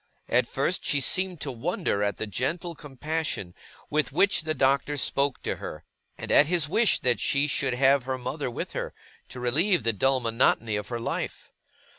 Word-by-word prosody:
At - - +3
first, - - -1
she 145 - +2
seemed 185 +4 0
to 140 - -2
wonder 115 -3 -1
at 100 0 0
the - - -2
gentle 165 - -2
compassion 145 - -4 0.4
with 150 -3 +1
which 195 +6 +3
the 155 0 -2
Doctor 140 +2 +2
spoke 140 0 +1
to - - -2
her, - - -7 0.3
and - - -5
at 145 - +6
his 170 -3 +2
wish 215 +7 +3
that 125 -2 +1
she 140 +1 +2
should 135 -3 0
have 135 0 +4
her 130 0 -2
mother 135 +2 -3
with 120 - -5
her, - - -4 0.3
to 125 - -8
relieve 165 +10 +2
the 115 - +2
dull 135 +6 +2
monotony 115 -2 +1
of 105 -1 -3
her 120 - -3
life. 115 - -4
135 Hz, 185 wpm, -27 LUFS, 125-155 Hz, 0.4 s, at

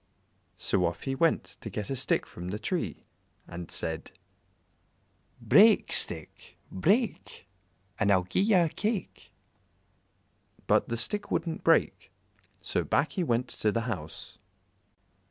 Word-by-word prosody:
So 90 - +1
off 85 - -5
he 135 - -2
went 160 -1 +2 0.2
to 110 - -6
get 105 +4 -5
a - - -1
stick - - 0
from 90 +1 -9
the 95 +3 -3
tree, 115 - -3 0.4
and 85 0 -8
said 80 -1 -3 1.3
"Break, - - +5
stick, - - -2
break, 160 - 0 0.5
And 100 -1 +3
I'll 95 -2 +4
gi'e 95 - 0
ye 205 +1 +3
a 170 -3 +4
cake." 210 +4 -4 1.3
But - - +2
the 115 - -2
stick 165 - -2
wouldn't 165 -2 -2
break, - - +2 0.5
so - - -1
back 155 - +1
he 185 - -1
went 125 -4 0
to 105 - 0
the 115 - -1
house. 100 -10 -6
115 Hz, 135 wpm, -29 LUFS, -, 1.3 s, Break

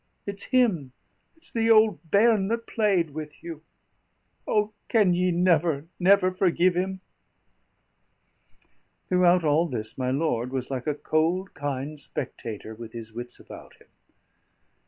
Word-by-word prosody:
It's 200 0 -4
him 205 - +1 0.4
it's 325 - -13
the 225 -1 +1
old 215 -8 +4
bairn 210 0 +4
that 230 +2 -2
played 195 -8 +1
with 150 0 -8
you 165 -3 -7 0.9
O, 210 0 +1 0.2
can 210 -6 +4
ye 180 +1 +1
never, 170 -4 +2
never 185 0 +4
forgive 185 -1 +2
him?" 190 +1 -2 2.1
Throughout 180 -1 +4
all 155 +3 +3
this 110 -4 -6
my 125 -1 0
lord 130 -3 -1
was 130 0 -4
like 130 0 -4
a 150 - 0
cold, 165 +6 0
kind 145 +1 -4
spectator 110 -4 -6
with 115 0 -10
his 115 -2 -9
wits 120 +1 -7
about - - -12
him. - - -24
170 Hz, 135 wpm, -26 LUFS, 140-195 Hz, 2.1 s, old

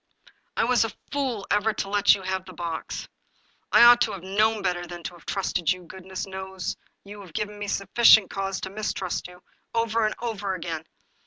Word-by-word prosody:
*' - - -42
I - - +3
was 245 0 +3
a 225 - -1 0.2
fool 260 -8 -1
ever 210 +1 +2
to 195 - -3
let 205 0 +5
you 195 - -8
have 190 0 -2
the 185 - -12
box! 165 -1 -5 0.6
I - - +8
ought 240 0 +9
to - - +2
have 185 - -7
known 210 +2 +1
better 175 -1 -1
than 175 0 -8
to - - -5
have 170 - -17
trusted 180 -4 0
you; 180 0 -3
goodness 190 +2 -7
knows 190 -1 -5 0.3
you 205 +1 -10
have 180 -5 -13
given 210 +2 -3
me 205 - -4
sufficient 215 +1 +5
cause 195 -1 -2
to 190 - -5
mistrust 195 -4 -3
you! 180 0 -15 0.3
Over 230 -1 +2
and 215 - -3
over 205 -5 -3
again 165 -2 -5
195 Hz, 200 wpm, -26 LUFS, 185-215 Hz, 0.6 s, ought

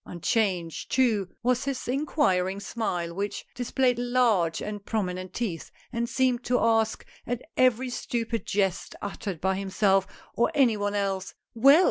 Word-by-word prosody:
Unchanged 175 -2 -1
too 220 -8 +2
was 250 +1 +1
his 275 -2 -3
inquiring 200 - +1
smile, 180 -6 -3
which 200 +2 -3
displayed 245 0 +1
large 240 -9 +2
and 210 -1 -5
prominent 185 -4 -2
teeth, 185 -7 -3 0.2
and 235 0 -1
seemed 255 -2 +1
to 245 0 +2
ask 225 -1 +2 0.2
at 245 0 -2
every 255 0 +3
stupid 230 -2 -3
jest 195 -2 0
uttered 200 -4 -5
by 190 +3 +1
himself, 195 0 +2 0.3
or 235 - +2
any 255 -6 +4
one 205 0 -1
else, 195 -2 -2 0.2
"Well 275 +7 +7
220 Hz, 140 wpm, -27 LUFS, 190-245 Hz, 0.3 s, Well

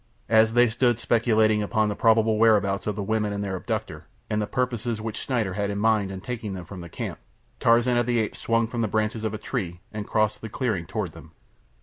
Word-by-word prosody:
As 110 0 +5
they 120 +1 +5
stood 120 +1 +2
speculating 110 -2 +2
upon 110 +1 +1
the 105 - -2
probable 110 -1 +3
whereabouts 100 -3 +3
of 105 - -1
the 100 - -3
women 105 0 0
and 100 0 -3
their 95 -2 -3
abductor, 95 - -4 0.2
and 105 0 +1
the 105 - -2
purpose 125 -3 -1 0.2
which 110 0 -4
Schneider 110 -8 -1
had 100 +1 -1
in 100 - -3
mind 105 -2 +2
in 95 -1 -6
taking 110 -4 -5
them 90 -2 -7
from 90 +1 -9
camp, - - -5 0.4
Tarzan 120 +1 +4
of 120 -1 +1
the 120 -1 +1
Apes 110 -2 -1
swung 115 0 +1
from 115 +1 -3
the 110 - +1
branches 110 +1 -1
of 110 -1 -2
a - - -3
tree 95 -7 -4
and 105 -1 -5
crossed 110 0 +1
the 110 - -6
clearing 105 - -2
toward - - -3
them. - - -14
110 Hz, 225 wpm, -25 LUFS, 105-115 Hz, 0.4 s, As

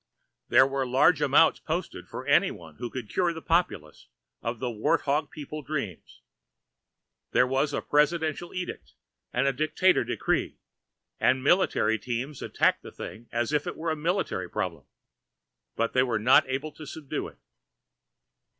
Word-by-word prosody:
There 130 - +7
were 135 0 -1
large 145 +5 +4
amounts - - +5
posted - - -4
for - - -7
anyone 80 -3 +1
who 120 - -4
could 125 -3 -6
cure 175 - 0
the 165 - -6
populace 165 - -1 0.3
of 115 +1 -3
the 125 +1 -3
wart 110 -1 +1
hog 145 +1 0
people 150 0 -7
dreams. 135 - -5 1.1
There 125 - +5
was 135 +3 0
presidential 155 +3 +1
edict 180 -1 -6 0.4
and 135 +2 +1
dictator 155 +6 +3
decree, - - -1 0.6
and 130 0 +2
military 135 - +3
teams 125 +5 -4
attacked - - +1
the - - -10
thing 115 +2 -9
as 120 +4 -1
a 155 +2 -1
military 155 - -1
problem, - - -3 0.9
but 115 0 -1
they 130 - +4
were 125 -4 +1
not 125 +4 +5
able 135 +4 -2
to 155 -1 -11
subdue 150 -2 -5
it. - - -15
135 Hz, 140 wpm, -27 LUFS, 120-155 Hz, 1.1 s, There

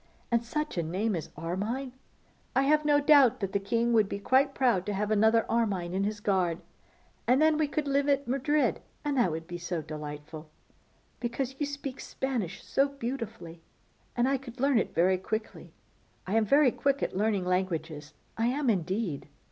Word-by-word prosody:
And 235 0 +2
such 300 - -3
a - - +2
name 190 +6 -1
as 165 - -5
Armine! 210 - -3 0.6
I 265 - +4
have 300 +2 +3
no 295 -1 +4
doubt 285 -4 +5
that 195 -3 -3
the 200 - +2
king 230 +4 0
would 215 -3 +4
be - - -3
quite 265 +7 +2
proud 240 -9 +2
to 205 - -1
have 210 +2 -1
another 220 +2 +4
Armine 200 -7 0
in 195 +1 0
his 210 0 -3
guard. 185 -5 0 0.7
And 255 +2 +4
then 310 0 +4
we 305 -1 +1
could 290 0 -2
live 280 +1 +1
at 280 -1 +1
Madrid; 275 +4 +1 0.2
and 290 -1 0
that 235 -7 +4
would 160 0 -4
be 175 0 -7
so 175 -2 -3
delightful, 150 +1 -8 0.7
because 250 +2 -3
you 290 - 0
speak 285 -2 -6
Spanish 240 -10 -3
so 275 +1 +2
beautifully, 230 -11 -6 0.5
and 240 +1 +2
I 275 0 +2
could 250 -1 -11
learn 275 -2 +3
it - - -3
very 185 +2 +3
quickly. 215 +3 -5 0.5
I 190 - -3
am 225 0 +3
very 280 +3 +5
quick 280 +2 0
at - - -2
learning 205 -2 +1
languages, 165 -5 -2 0.2
I 230 - +2
am, 265 0 +1
indeed. 185 -4 -2
225 Hz, 185 wpm, -29 LUFS, 185-270 Hz, 0.7 s, doubt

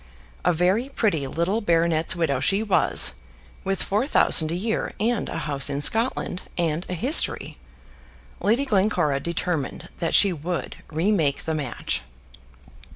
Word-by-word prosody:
A - - +3
very 185 +10 +1
pretty 185 - 0
little 170 +10 -1
baronet's 165 -4 +2
widow 155 -6 0
she 195 +10 +1
was, 190 - +2 0.5
with 195 0 -1
four 210 +7 0
thousand 160 - +3
a - - -1
year, 220 +5 -2
and 230 +1 0
a - - -4
house 145 -3 0
in 140 0 -2
Scotland, 220 - 0 0.2
and 170 0 -1
a 180 - -2
history. 260 - 0 0.8
Lady 235 +7 +1
Glencora 195 - +1
determined 170 -2 -3
that 165 - 0
she 200 -3 +6
would 170 +2 -4
remake 160 -3 0
the 160 - -2
match. 140 -6 -3
175 Hz, 140 wpm, -24 LUFS, 155-205 Hz, 0.8 s, she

